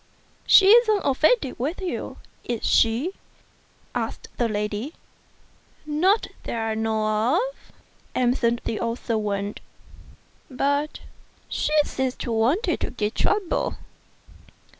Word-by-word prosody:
" -, -, -35 dB
She 385 Hz, -, +8 dB
isn't 435 Hz, -2 st, +6 dB
offended 280 Hz, -, +2 dB
with 295 Hz, +9 st, -2 dB
you; 370 Hz, -3 st, -4 dB, 0.3 s
is 235 Hz, -2 st, -3 dB
she?" 235 Hz, +10 st, +3 dB, 0.8 s
asked -, -, -4 dB
the 240 Hz, -2 st, +1 dB
lady. 210 Hz, +6 st, -3 dB, 0.9 s
"Not 350 Hz, +8 st, +2 dB, 0.2 s
that -, -, -4 dB
I 225 Hz, 0 st, -1 dB
know 220 Hz, +3 st, +1 dB
of," -, -, -3 dB, 0.4 s
answered 240 Hz, -1 st, +1 dB
the 220 Hz, -, -2 dB
old 230 Hz, 0 st, -2 dB
servant; 205 Hz, -4 st, -2 dB, 0.9 s
"but 285 Hz, +3 st, -1 dB, 0.5 s
she -, -, -2 dB
seems 260 Hz, -1 st, -2 dB
to 240 Hz, -, -5 dB
want 235 Hz, -, +2 dB
to -, -, +1 dB
give 215 Hz, -2 st, -3 dB
trouble?" 410 Hz, -, 0 dB
250 Hz, 115 wpm, -24 LUFS, 225-320 Hz, 0.9 s, She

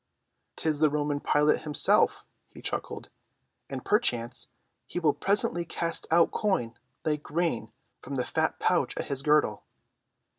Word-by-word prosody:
"'Tis 155 Hz, -2 st, 0 dB
the 155 Hz, -1 st, +5 dB
Roman 145 Hz, 0 st, -1 dB
Pilate 150 Hz, +1 st, +2 dB
himself," 150 Hz, -2 st, +3 dB, 0.2 s
he -, -, -14 dB
chuckled, -, -, -5 dB, 0.6 s
"and 135 Hz, -2 st, -6 dB
perchance 125 Hz, -, +1 dB, 0.4 s
he -, -, -7 dB
will 155 Hz, -4 st, +3 dB
presently 195 Hz, -3 st, +2 dB
cast 170 Hz, 0 st, -2 dB
out 165 Hz, +1 st, +4 dB
coin 190 Hz, -, 0 dB, 0.3 s
like 150 Hz, -2 st, 0 dB
grain 165 Hz, -5 st, -2 dB, 0.3 s
from 140 Hz, -, -6 dB
the 125 Hz, -2 st, -1 dB
fat -, -, -1 dB
pouch -, -, +1 dB
at -, -, -4 dB
his 135 Hz, -1 st, -2 dB
girdle." 150 Hz, +1 st, +2 dB
150 Hz, 140 wpm, -28 LUFS, 140-170 Hz, 0.6 s, the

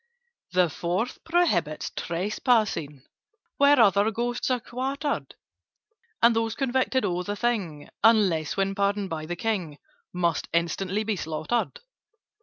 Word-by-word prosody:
"The 180 Hz, -1 st, +4 dB
Fourth 175 Hz, -, -3 dB
prohibits 205 Hz, -, +1 dB
trespassing 180 Hz, -, 0 dB, 0.5 s
Where 285 Hz, -1 st, +5 dB
other 205 Hz, -1 st, +5 dB
Ghosts 240 Hz, +3 st, -2 dB
are 255 Hz, -1 st, +1 dB
quartered: 270 Hz, +5 st, -3 dB, 0.9 s
And 235 Hz, 0 st, +6 dB
those 225 Hz, 0 st, 0 dB
convicted 260 Hz, -2 st, 0 dB
of 180 Hz, -1 st, -2 dB
the 205 Hz, -, -2 dB
thing 195 Hz, -10 st, -2 dB, 0.2 s
(Unless 195 Hz, -9 st, +3 dB
when 195 Hz, 0 st, +1 dB
pardoned 200 Hz, -1 st, 0 dB
by 155 Hz, -1 st, -4 dB
the 175 Hz, -, -3 dB
King) 180 Hz, -7 st, -2 dB, 0.3 s
Must 170 Hz, -3 st, -1 dB
instantly 185 Hz, +5 st, 0 dB
be 215 Hz, -1 st, -1 dB
slaughtered. 175 Hz, -, -2 dB
205 Hz, 120 wpm, -26 LUFS, 170-240 Hz, 0.9 s, And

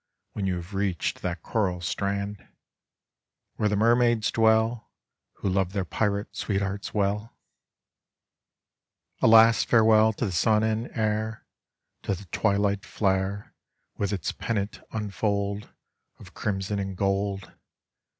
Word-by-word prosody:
hen 100 Hz, -2 st, -1 dB
you 95 Hz, -, 0 dB
have 90 Hz, +3 st, -8 dB
reached 95 Hz, -3 st, -1 dB
that 85 Hz, -2 st, -4 dB
coral 95 Hz, -5 st, -1 dB
strand, 100 Hz, +3 st, -2 dB, 1.2 s
TOiere 105 Hz, -, +2 dB
the 105 Hz, -, +1 dB
nsraaids 120 Hz, +1 st, +3 dB
dwell, 110 Hz, +1 st, +2 dB, 0.5 s
?ho -, -, -4 dB
love 95 Hz, -1 st, 0 dB
their 100 Hz, -3 st, -1 dB
pirate 100 Hz, +2 st, -1 dB
sweethearts 100 Hz, -1 st, -2 dB
well? 105 Hz, +2 st, -1 dB, 1.8 s
A -, -, +5 dB
last 115 Hz, 0 st, +6 dB
farewell 110 Hz, -1 st, +5 dB
to 115 Hz, -, -2 dB
the 100 Hz, -, -2 dB
sun 110 Hz, +4 st, +3 dB
and 110 Hz, +2 st, -1 dB
air, 110 Hz, 0 st, -1 dB, 0.6 s
To 100 Hz, -, -1 dB
the 100 Hz, +3 st, -11 dB
twilight 100 Hz, -1 st, +1 dB
flare 100 Hz, -2 st, -1 dB, 0.5 s
Tftth 100 Hz, -1 st, 0 dB
its 95 Hz, -5 st, -2 dB
pennant 105 Hz, -3 st, -3 dB
unfold 100 Hz, -1 st, -2 dB, 0.5 s
Of -, -, -14 dB
criuson 100 Hz, 0 st, -2 dB
and 95 Hz, -1 st, -5 dB
gold! 100 Hz, -1 st, -1 dB
100 Hz, 120 wpm, -26 LUFS, 100-110 Hz, 1.8 s, last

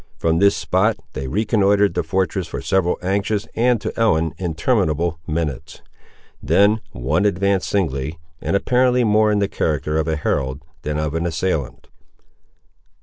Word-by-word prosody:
From 80 Hz, 0 st, +1 dB
this 100 Hz, 0 st, +4 dB
spot 105 Hz, +4 st, +1 dB, 0.2 s
they 65 Hz, 0 st, -4 dB
reconnoitred 105 Hz, -, +2 dB
the -, -, 0 dB
fortress 95 Hz, -3 st, -1 dB
for -, -, -5 dB
several 95 Hz, -2 st, +1 dB
anxious, 100 Hz, +2 st, -1 dB
and 120 Hz, 0 st, +2 dB
to -, -, -4 dB
Ellen, 80 Hz, -9 st, +2 dB
interminable 85 Hz, -, 0 dB
minutes. 75 Hz, -5 st, -4 dB, 0.6 s
Then 105 Hz, +2 st, +3 dB
one 70 Hz, +9 st, 0 dB
advanced 100 Hz, -1 st, +1 dB
singly, 75 Hz, -5 st, -1 dB, 0.2 s
and -, -, -1 dB
apparently 125 Hz, +4 st, +2 dB
more 110 Hz, -1 st, +3 dB
in 105 Hz, -, +2 dB
the 100 Hz, -1 st, +1 dB
character 75 Hz, -4 st, -1 dB
of 80 Hz, -, -1 dB
a 80 Hz, -, 0 dB
herald 70 Hz, -2 st, -2 dB, 0.2 s
than 75 Hz, 0 st, -3 dB
of 75 Hz, -1 st, -2 dB
an 80 Hz, +1 st, -1 dB
assailant. 80 Hz, -5 st, -2 dB
90 Hz, 145 wpm, -20 LUFS, 80-105 Hz, 0.6 s, this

